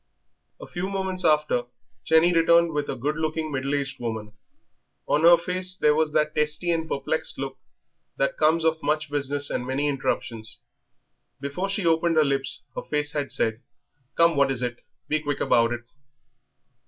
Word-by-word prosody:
A - - -8
few 185 +1 -4
moments 190 -1 -2
after 150 -5 +2 0.4
Jenny 160 +2 +4
returned 170 0 +4
with 145 -1 -2
a - - -2
good 150 +5 -2
looking, 155 0 -2
middle 135 +1 -1
aged 140 -1 -3
woman. 110 -3 -4 0.8
On 150 - +2
her 170 +1 +8
face 185 +2 -3
there 150 -4 +4
was 155 0 +1
that 150 0 +1
testy 150 +3 0
and 160 -1 -1
perplexed 140 +3 -2
look 135 0 -5 0.6
that - - 0
comes 160 +1 +2
of 160 0 +1
much 150 0 -1
business 145 0 +1
and - - -2
many 135 +3 -1
interruptions. 115 -5 -3 0.8
Before 140 +8 -3
she 200 0 -1
had 170 - +3
opened 165 +1 +2
her 155 -1 +5
lips 135 -1 0
her - - -3
face 150 0 -2
had 145 -2 -3
said: 110 +1 -1 0.6
"Come, 170 -1 +5
what 140 -1 +3
is 130 -2 -1
it? 120 0 -4 0.3
Be 155 - +1
quick 145 -1 -3
about 115 0 +3
it." 120 0 -4
150 Hz, 175 wpm, -25 LUFS, 135-165 Hz, 0.8 s, her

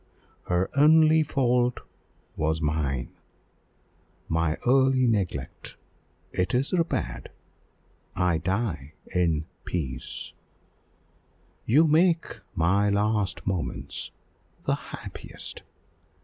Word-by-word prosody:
Her 90 +1 +1
only 155 +2 +6
fault 125 -4 +1 0.5
was 80 0 0
mine 75 -5 -1 1.2
my 80 -1 0
early 130 0 +4
neglect: 95 - -2 0.6
it 90 +6 0
is 135 +7 0
repaired 165 - -1 0.9
I 90 -3 +2
die 85 - -2 0.2
in 80 -4 +1 0.2
peace! 65 -8 -4 1.3
You 150 +8 +6
make 165 +2 +2 0.2
my 95 +5 +3
last 105 -2 0
moments 95 -4 -3 0.5
the - - +1
happiest! - - -7
95 Hz, 80 wpm, -26 LUFS, 80-130 Hz, 1.3 s, only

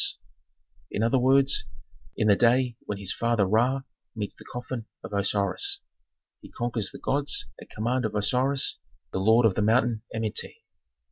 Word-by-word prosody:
In 105 - -1
other 115 +3 +3
words, 135 +2 +4 0.5
in 105 - +2
the 100 - +6
day 120 +2 +3
when 105 - -3
his 100 -1 -2
father 115 -3 +1
Ra 120 +7 +2 0.3
meets 105 -2 -4
the - - -14
coffin 125 -2 -5 0.2
of - - -8
Osiris. 100 - +1 0.6
He - - -12
conquers 120 -4 -2
the - - -10
gods 140 +1 -1 0.2
at - - -12
command 120 +3 -1
of 110 -1 -3
Osiris, 130 +7 +1 0.3
the - - -2
lord 110 +4 +5
of 110 - +4
the 105 - -1
mountain 115 +1 +2
Amenti. 110 -1 -4
115 Hz, 155 wpm, -27 LUFS, 105-130 Hz, 0.6 s, the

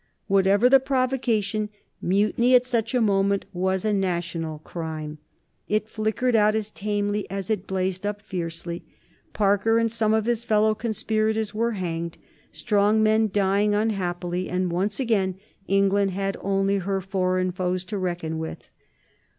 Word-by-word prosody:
Whatever 195 +3 +4
the 270 +1 +7
provocation, 250 -6 0 0.3
mutiny 210 +7 +3
at 250 0 +5
such 235 -1 -1
a 250 - +3
moment 200 -2 +2
was 190 +2 0
a 215 - +2
national 170 -4 -2
crime. 155 -1 -6 0.5
It 215 +1 0
flickered 220 +3 0
out 215 0 +4
as 215 -1 -2
tamely 205 0 -2
as 195 +1 -4
it 205 -3 -2
blazed 185 0 -2
up 205 0 -2
fiercely. 170 -3 -5 0.5
Parker 205 +2 +2
and 230 -1 +1
some 220 -2 +1
of 220 -1 +1
his 235 -1 0
fellow 215 -1 +3
conspirators 220 -1 -1
were 230 +2 0
hanged, 170 -3 -4 0.3
strong 210 0 +2
men 220 0 +3
dying 200 +1 +2
unhappily, 180 -4 -1
and 180 -1 -1
once 195 +6 -1
again 205 -7 +1 0.3
England 195 0 +3
had 195 +1 -2
only 195 0 +1
her 195 +1 -1
foreign 185 -1 0
foes 180 0 -2
to 200 +2 -4
reckon 175 -3 -3
with. 160 0 -7
200 Hz, 145 wpm, -25 LUFS, 185-220 Hz, 0.5 s, the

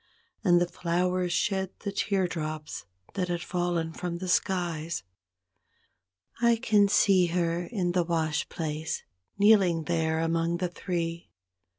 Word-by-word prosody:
And 175 -4 +5
the 175 - +2
flowers 180 +1 0
shed 190 -1 0
the 200 - -3
teardrops 165 -7 -2 0.3
that 185 -2 -1
had 175 -1 -2
fallen 175 -2 -1
from 175 -1 -4
the 185 +1 -5
skies; 170 - 0 1.4
I 235 -1 +5
can 210 -2 +3
see 195 -3 +4
her 170 0 0
in 180 -4 -1
the 175 0 +2
wash 160 -2 -1
place, 155 -1 -3 0.3
kneeling 195 -6 +5
there 160 -1 0
among 165 +1 0
the 180 0 -1
three. 170 -2 -4
175 Hz, 125 wpm, -28 LUFS, 165-185 Hz, 1.4 s, And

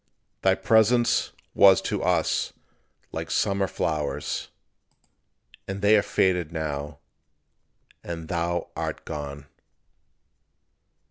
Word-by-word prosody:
Thy 95 0 +4
presence 115 +2 +3 0.2
was 95 -1 +7
to - - -2
us - - +1 0.6
like 80 0 -5
summer 100 +2 +1
flowers; 75 -5 -2 1.2
And 95 +1 -5
they 105 +1 +6
are 105 - +5
faded 90 -5 +1
now; 75 -2 -4 1.1
and 85 -2 -6
thou 85 +1 -2
art - - -4
gone. 70 -1 -6
85 Hz, 90 wpm, -25 LUFS, 80-100 Hz, 1.2 s, was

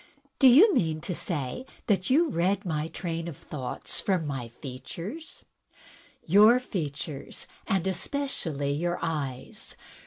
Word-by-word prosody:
" 280 -1 -38
Do 270 - +8
you 340 - +8
mean 160 - +1
to 180 - -3
say 155 - -3 0.2
that 190 -4 +1
you 315 +6 +5
read 195 - 0
my 155 -2 -1
train 165 -1 -4
of 160 -5 -6
thoughts 130 -5 -6
from 185 -5 +1
my 135 -5 -3
features?" 145 - -8 0.8
"Your 210 +8 +7
features, 155 - -5 0.2
and 190 -2 +1
especially 175 - -2
your 175 +4 -1
eyes. 140 -6 -4
170 Hz, 130 wpm, -28 LUFS, 145-205 Hz, 0.8 s, Do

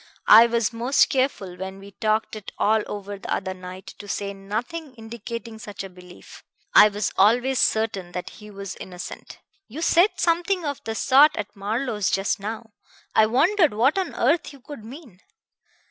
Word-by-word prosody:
"I 225 +2 +9
was 230 -2 0
most 240 +4 +2
careful, 255 -9 -1
when 190 +1 -6
we 200 +1 -12
talked 215 +2 -1
it 215 -2 -8
all 220 +1 +2
over 205 -1 -6
the - - -8
other 190 -1 -2
night, 185 0 -10
to 205 - -10
say 200 0 -3
nothing 240 +10 -5
indicating 230 0 -8
such 205 -2 -7
a 195 - -9
belief. 180 0 -15 0.3
I - - +9
was 205 0 -3
always 245 +6 +3
certain 205 -5 0
that 180 - -5
he 210 0 -13
was 200 -2 -7
innocent." 180 -1 -9 0.3
"You 310 +8 -6
said 345 +5 +5
something 350 +1 +1
of 285 -2 -4
the 225 - -3
sort 275 +6 +5
at 210 -1 -5
Marlowe's 210 +1 -2
just 195 +1 0
now. 220 +2 -6 0.4
I 215 - +5
wondered 310 - +3
what 255 +7 +3
on 375 - -3
earth 300 +7 +1
you 280 - -14
could 285 -4 -10
mean. 240 - -12
220 Hz, 175 wpm, -24 LUFS, 200-260 Hz, 0.4 s, I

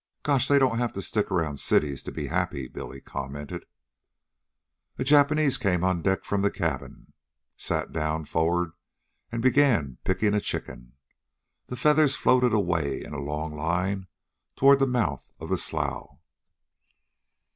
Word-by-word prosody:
"Gosh! 140 -4 +2
they 145 - +5
don't 130 -4 +3
have 120 -2 -1
to 100 - -4
stick 105 -2 -1
around 80 -7 -1
cities 70 -3 +1
to - - -7
be - - -4
happy," 85 -7 -2
Billy 70 +1 -8
commented. 70 +2 -6 1.3
A - - -1
Japanese 145 0 +4
came 90 -7 +1
on 95 -2 +1
deck 95 +3 0
from 100 -1 0
the 100 - +3
cabin, - - -4 0.4
sat - - -2
down 80 0 -2
for'ard, 85 +2 0 0.6
and 115 0 -3
began 120 - +3
picking 105 +2 +1
a 105 - +2
chicken. - - -5 0.7
The 125 - -5
feathers 150 +1 +4
floated 125 -1 +3
away 85 -9 0
in - - -9
a 75 - -4
long 75 +2 -4
line 90 +5 -1 0.5
toward 140 +1 +6
the 135 - +3
mouth 115 - -1
of - - -7
the - - +1
slough. - - -2
95 Hz, 145 wpm, -26 LUFS, 75-125 Hz, 1.3 s, toward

